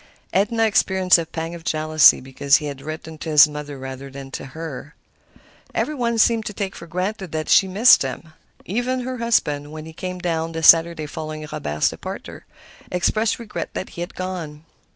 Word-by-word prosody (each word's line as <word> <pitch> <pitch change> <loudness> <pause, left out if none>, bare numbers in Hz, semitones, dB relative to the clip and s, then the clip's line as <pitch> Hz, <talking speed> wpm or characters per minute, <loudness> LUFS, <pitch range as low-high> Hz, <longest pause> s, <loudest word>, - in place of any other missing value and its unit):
Edna 220 +4 +2
experienced 190 -4 +3
a 165 - -4
pang 165 +1 -5
of 170 -1 -9
jealousy 155 -2 +4
because 135 +2 +2
he 155 - +1
had 140 -2 -6
written 155 +1 -8
to 160 - -5
his 150 -1 +8
mother 150 -1 -7
rather 135 +1 -8
than 135 0 -10
to - - -6
her. 150 +1 -8 0.8
Every 305 - 0
one 235 -4 -1
seemed 225 0 +3
to 210 - -5
take 195 -1 -4
for 170 - -10
granted 185 +2 -3
that 155 0 -3
she 190 - +5
missed 210 +7 +6
him. 150 +4 -5 0.3
Even 245 +6 -1
her 255 0 -5
husband, 150 -11 0
when 155 0 -8
he 160 - -10
came 180 +2 -5
down 165 -2 -2
the 160 0 -4
Saturday 165 -1 +6
following 155 0 -6
Robert's 75 +1 0
departure, - - -8 0.4
expressed 215 +5 +1
regret 230 -3 -6
that - - -4
he 170 - -8
had 175 - -6
gone. 170 -5 -6
165 Hz, 185 wpm, -22 LUFS, 150-195 Hz, 0.8 s, his